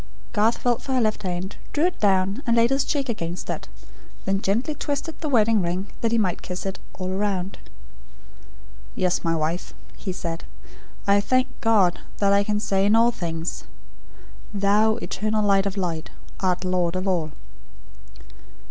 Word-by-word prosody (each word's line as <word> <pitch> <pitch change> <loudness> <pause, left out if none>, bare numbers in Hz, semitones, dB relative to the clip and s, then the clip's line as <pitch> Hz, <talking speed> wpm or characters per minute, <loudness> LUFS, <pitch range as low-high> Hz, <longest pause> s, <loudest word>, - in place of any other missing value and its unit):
Garth 220 +1 +3
felt 240 -2 +1
for 265 - -3
her 255 - +3
left 215 -1 +1
hand, 185 0 -3 0.2
drew 300 +3 +2
it 360 - -1
down, 195 +2 +2
and 235 0 +3
laid 235 +2 +4
his 270 0 +3
cheek 280 -2 -1
against 175 -7 -3
it; - - -5 0.6
then 195 0 +1
gently 230 +11 0
twisted 290 +2 -3
the 310 - -1
wedding 225 -4 +4
ring 180 +3 -2
that 230 - +1
he 230 - +3
might 190 -6 +1
kiss 180 0 -5
it 195 0 -3 0.2
all 185 -1 -4
round. 195 -1 -1 1.4
"Yes, 180 -1 +1
my 165 0 +1
wife," 160 +3 -2 0.2
he 190 - -4
said. 170 -2 -4 0.6
"I 200 0 +4
thank 255 +4 +2
God, 205 -6 +4 0.2
that 200 -1 +3
I 200 0 +4
can 210 0 0
say 195 -2 +2
in 210 - +5
all 230 +1 +5
things: 165 -5 -4 0.9
'Thou, 205 +2 +4
Eternal 215 -2 -1
Light 195 -1 +4
of 200 +1 -4
Light, 170 -4 -2 0.3
art 185 -1 0
Lord 180 -1 +1
of 185 +1 -1
All.'" 165 -5 0
200 Hz, 165 wpm, -24 LUFS, 185-225 Hz, 1.4 s, in